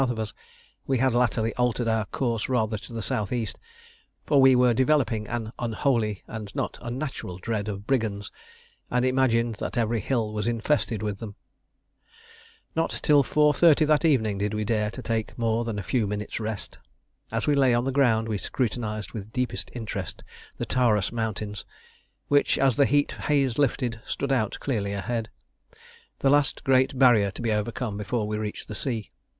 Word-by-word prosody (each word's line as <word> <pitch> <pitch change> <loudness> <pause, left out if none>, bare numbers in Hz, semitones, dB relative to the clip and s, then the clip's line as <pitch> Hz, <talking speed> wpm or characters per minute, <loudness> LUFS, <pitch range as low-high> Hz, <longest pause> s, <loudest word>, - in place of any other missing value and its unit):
of 120 - -2
us, 110 -1 -4 0.5
we 135 - +2
had 130 0 +2
latterly 115 -2 +1
altered 125 -1 +1
our 110 -1 +1
course 115 +2 -2
rather 110 -4 +1
to 105 +3 -8
the 115 -2 -4
S.E.; 110 +2 -1 0.8
for 140 -2 +4
we 130 -1 +7
were 125 -1 +4
developing 125 -4 +2
an 115 -2 -4
unholy 115 -3 0
and 105 -3 -8
not - - -3
unnatural 120 -7 -5
dread 105 +1 -3
of 100 -1 -5
brigands, 110 -6 -1 0.6
and 125 +1 +1
imagined 120 -3 +2
that - - -4
every 115 0 +1
hill 110 -1 -1
was 105 +1 -2
infested 115 -2 0
with 105 -2 -3
them. 105 -3 -7 1.4
Not 165 0 0
till 145 -2 +5
4.30 150 +2 +4
that 150 +1 +3
evening 110 -11 +2
did 105 +1 -1
we 105 - -1
dare 105 -1 +1
to 125 +4 -8
take 115 -2 -2
more 115 0 +1
than 115 -3 -3
a 100 - -3
few 115 +1 0
minutes' 105 +2 -4
rest. 110 -2 -5 0.5
As - - -1
we 150 - +3
lay 135 -3 +4
on 120 +1 +2
the 135 - 0
ground 120 -5 +3
we 105 -3 -2
scrutinised 110 -4 -2
with 110 -1 -7
deepest 125 +1 -2
interest 100 -7 -5 0.3
the - - -2
Taurus 110 -6 +2
Mountains, 110 -3 -3 0.6
which, 145 0 +3
as 135 -3 +3
the 140 - +4
heat 145 0 +2 0.2
haze 140 -5 +2
lifted, 125 -4 0
stood 140 - -2
out 115 -6 +1
clearly 105 -7 -2
ahead 110 +2 -3 0.9
the 135 - +4
last 145 -1 +2
great 130 0 +3
barrier 120 -6 +5
to 100 - -8
be 115 - +1
overcome 105 0 -2
before 105 +1 -2
we 105 0 -2
reached 105 -1 -5
the - - -6
sea. 110 0 -3
115 Hz, 175 wpm, -26 LUFS, 105-130 Hz, 1.4 s, we